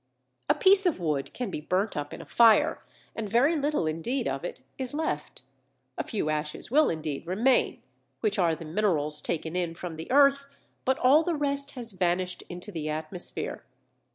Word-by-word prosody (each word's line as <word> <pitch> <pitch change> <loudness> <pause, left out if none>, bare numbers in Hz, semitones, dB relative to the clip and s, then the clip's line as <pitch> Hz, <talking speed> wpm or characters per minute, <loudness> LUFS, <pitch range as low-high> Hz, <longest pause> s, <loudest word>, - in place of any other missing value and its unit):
A - - +5
piece 390 0 +5
of 335 - 0
wood 145 -5 -2
can 245 -6 -4
be 150 - -4
burnt 190 +7 -1
up 145 0 -4
in - - -8
a - - -16
fire 240 +7 +4 0.3
and 220 -2 -4
very 260 - +3
little 295 - 0
indeed 165 - -2
of - - -3
it - - -6 0.2
is 260 +1 -2
left. 315 +1 -3 0.5
A - - -2
few 210 -9 -3
ashes 150 +6 -4
will 305 +3 +4
indeed 155 -1 -4
remain, 230 +9 +1 0.4
which 210 -2 0
are 170 -3 +3
the 165 +1 -9
minerals 155 -4 +2
taken 160 +1 -3
in 175 -2 -1
from 165 -2 -7
the 160 - -8
earth, 280 +1 +4 0.4
but 265 0 +2
all 275 +5 +5
the 335 0 -1
rest 280 -1 -1
has 240 -3 0
vanished 180 0 -1
into 180 +4 -6
the 155 -4 -4
atmosphere. 155 +4 -4
195 Hz, 180 wpm, -27 LUFS, -, 0.5 s, A